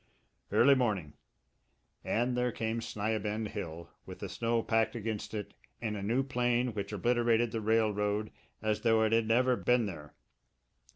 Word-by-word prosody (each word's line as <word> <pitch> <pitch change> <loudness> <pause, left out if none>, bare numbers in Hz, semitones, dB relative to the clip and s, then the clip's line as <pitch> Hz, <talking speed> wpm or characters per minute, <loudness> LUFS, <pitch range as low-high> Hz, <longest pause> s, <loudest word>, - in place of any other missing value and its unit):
Early 140 +4 +6
morning 105 - 0 0.9
and 120 +2 0
there 125 0 +1
came 110 +1 -2
Sni 110 -1 -2
a - - -1
bend 105 +1 -3
Hill, 85 -5 -6
with - - -9
the - - -6
snow 115 0 0
packed 115 0 +1
against 110 -1 -4
it 105 -2 -5 0.3
in 110 -2 -3
a 100 - -4
new 115 +7 +1
plane 125 -2 0
which 100 -1 -4
obliterated 120 +2 +2
the 115 - -2
railroad 105 -1 +1 0.3
as 110 -1 0
though 115 -1 +4
it 110 - +2
had 115 -1 +3
never 125 +3 +3
been 125 -1 +2
there. 75 -7 -8
110 Hz, 165 wpm, -31 LUFS, 105-120 Hz, 0.9 s, Early